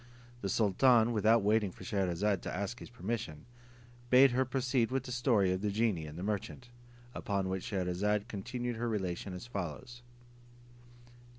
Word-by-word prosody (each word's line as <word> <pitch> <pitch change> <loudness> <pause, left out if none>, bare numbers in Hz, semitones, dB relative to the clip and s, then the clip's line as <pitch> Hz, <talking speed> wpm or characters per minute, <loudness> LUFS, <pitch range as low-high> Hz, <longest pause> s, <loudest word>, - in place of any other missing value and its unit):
The 100 - -2
sultan, 115 +3 +4
without 110 0 +3
waiting 105 0 +2
for - - -13
Scheherazade 95 0 0
to - - -5
ask 100 +5 -4
his - - -10
permission, 100 -8 -5 0.6
bade 130 +1 +7
her 130 +2 +2
proceed 130 -2 0
with 130 0 -1
the 125 - -7
story 120 -6 +2
of 95 0 -1
the 105 - 0
genie 100 -6 0
and 75 +2 -9
the 90 - -5
merchant; 105 +4 -4 0.4
upon 100 -3 -2
which 95 -1 -3
Scheherazade 100 +2 -1
continued 120 +3 -4
her 120 +1 -1
relation 95 -3 -3
as 90 - -8
follows. 100 - -6
105 Hz, 160 wpm, -32 LUFS, 95-120 Hz, 0.6 s, bade